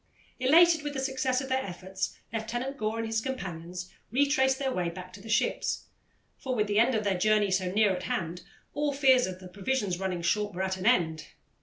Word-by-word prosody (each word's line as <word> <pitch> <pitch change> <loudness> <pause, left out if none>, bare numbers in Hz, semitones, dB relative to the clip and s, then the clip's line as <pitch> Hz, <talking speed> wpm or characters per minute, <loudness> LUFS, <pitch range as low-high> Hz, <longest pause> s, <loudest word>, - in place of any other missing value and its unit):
Elated 320 +5 +6
with 290 0 -4
the - - -1
success 265 -1 0
of 270 - -6
their 265 0 +1
efforts, 190 +1 -5 0.2
Lieutenant 240 +5 -3
Gore 215 -2 -2
and 230 - -2
his 225 0 -1
companions 180 -8 -5 0.2
retraced 265 0 +3
their 270 -1 -1
way 180 -6 -1
back 180 +1 -9
to 200 - -11
the 225 - -11
ships, 210 - 0 0.6
for 260 -1 -2
with 210 -2 +2
the 205 0 +1
end 245 +2 +4
of 215 - 0
their 195 -3 0
journey 210 0 +3
so 185 -1 +1
near 205 -1 +3
at 180 - -5
hand, 170 +1 -2 0.3
all 290 0 0
fears 265 -4 +4
of 185 -1 -6
the 185 - -10
provisions 195 0 -2
running 185 -3 -2
short 205 +2 0
were 190 - -1
at 190 0 -1
an 190 +2 -2
end. 160 -10 +2
215 Hz, 210 wpm, -29 LUFS, 185-265 Hz, 0.6 s, Elated